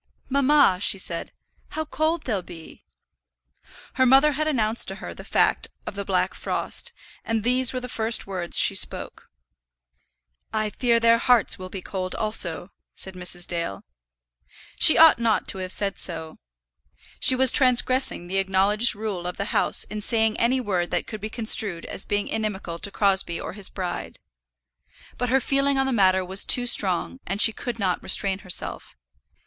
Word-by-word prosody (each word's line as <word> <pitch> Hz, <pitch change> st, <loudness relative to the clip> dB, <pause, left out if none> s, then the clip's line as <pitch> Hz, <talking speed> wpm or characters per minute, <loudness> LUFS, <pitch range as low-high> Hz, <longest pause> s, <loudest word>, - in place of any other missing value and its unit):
"Mamma," 280 Hz, -7 st, +3 dB
she 205 Hz, -, +5 dB
said, 170 Hz, -3 st, -2 dB, 0.4 s
"how 315 Hz, 0 st, -5 dB
cold 315 Hz, +2 st, -2 dB
they'll 210 Hz, -7 st, -3 dB
be!" 165 Hz, -2 st, -14 dB, 1.1 s
Her 260 Hz, -, +1 dB
mother 270 Hz, +4 st, +5 dB
had 310 Hz, +2 st, -2 dB
announced 230 Hz, -6 st, 0 dB
to -, -, -3 dB
her -, -, -9 dB
the -, -, -12 dB
fact -, -, 0 dB, 0.2 s
of -, -, -6 dB
the -, -, -5 dB
black -, -, -1 dB
frost, 485 Hz, -, -3 dB, 0.3 s
and 225 Hz, -2 st, -2 dB
these 250 Hz, +1 st, +1 dB
were 255 Hz, -, -4 dB
the 250 Hz, -, -8 dB
first 225 Hz, -2 st, 0 dB
words 185 Hz, -3 st, -2 dB
she -, -, +6 dB
spoke. -, -, 0 dB, 1.2 s
"I 215 Hz, -1 st, -2 dB
fear 235 Hz, +1 st, +1 dB
their 230 Hz, 0 st, +3 dB
hearts 245 Hz, -5 st, +1 dB
will 185 Hz, 0 st, -8 dB
be 185 Hz, -1 st, -8 dB
cold 185 Hz, -1 st, -5 dB
also," 195 Hz, -5 st, -2 dB, 0.2 s
said 190 Hz, -, -10 dB
Mrs. 180 Hz, -1 st, -3 dB
Dale. 170 Hz, -, -4 dB, 1.0 s
She 315 Hz, -, +8 dB
ought 320 Hz, -6 st, +6 dB
not 230 Hz, -2 st, 0 dB
to 190 Hz, -, -4 dB
have 185 Hz, 0 st, -6 dB
said 200 Hz, 0 st, 0 dB
so. 160 Hz, -2 st, -3 dB, 0.8 s
She 260 Hz, -, +5 dB
was 260 Hz, -1 st, +6 dB
transgressing 255 Hz, -6 st, +3 dB
the 190 Hz, +2 st, -2 dB
acknowledged 195 Hz, +4 st, +3 dB
rule 200 Hz, -5 st, -5 dB
of 180 Hz, -, -7 dB
the 200 Hz, -, -4 dB
house -, -, 0 dB
in 210 Hz, 0 st, -7 dB
saying 220 Hz, 0 st, +1 dB
any 255 Hz, +3 st, +1 dB
word 185 Hz, -7 st, -2 dB
that -, -, -2 dB
could 215 Hz, -2 st, -9 dB
be 215 Hz, -, -5 dB
construed 215 Hz, -6 st, +1 dB
as -, -, -4 dB
being 205 Hz, 0 st, -2 dB
inimical 205 Hz, -6 st, -4 dB
to 200 Hz, -, -3 dB
Crosbie 190 Hz, -4 st, 0 dB
or -, -, -7 dB
his 200 Hz, -1 st, -3 dB
bride. 180 Hz, -2 st, -6 dB, 1.0 s
But 245 Hz, -, -2 dB
her 265 Hz, +2 st, +2 dB
feeling 275 Hz, +1 st, 0 dB
on 270 Hz, -, +1 dB
the 265 Hz, -, -2 dB
matter 190 Hz, -3 st, +2 dB
was 190 Hz, +2 st, -1 dB
too 245 Hz, -, +2 dB
strong, 200 Hz, +1 st, +1 dB
and 195 Hz, -, -3 dB
she 225 Hz, -, +6 dB
could 245 Hz, -1 st, -6 dB
not 190 Hz, -4 st, -2 dB
restrain 190 Hz, 0 st, +1 dB
herself. 185 Hz, -, -6 dB
215 Hz, 175 wpm, -23 LUFS, 185-250 Hz, 1.2 s, She